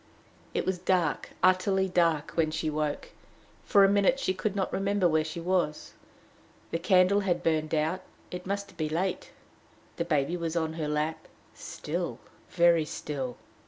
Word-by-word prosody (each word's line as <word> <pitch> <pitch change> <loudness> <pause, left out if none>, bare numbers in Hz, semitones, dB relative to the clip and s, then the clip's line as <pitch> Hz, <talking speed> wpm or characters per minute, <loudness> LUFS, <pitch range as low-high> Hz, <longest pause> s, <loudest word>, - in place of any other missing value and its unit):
It - - 0
was 185 -1 -1
dark, 175 -4 0
utterly 190 +1 +3
dark, 165 -4 +1
when 160 -2 +1
she 155 0 -2
woke. 150 -1 -2 0.5
For 200 -3 +5
a - - +7
minute 205 +7 +3
she 185 - 0
could 195 +2 -2
not 190 -2 -1
remember 195 -1 +2
where 160 -1 +2
she 155 +2 -6
was. 170 -3 -1 0.8
The 165 - -1
candle 185 +2 +4
had 180 -3 0
burned 155 -1 +1
out: 160 +4 0 0.3
it 180 0 -6
must 200 0 -4
be 155 -1 -1
late. 175 +4 -2 0.7
The - - -1
baby 150 +3 +1
was 165 -1 -3
on 160 -1 0
her 160 -2 -3
lap 150 +1 -2 0.3
still, - - -4 0.3
very 170 -1 +4
still. 135 -4 -5
170 Hz, 160 wpm, -28 LUFS, 155-190 Hz, 0.8 s, a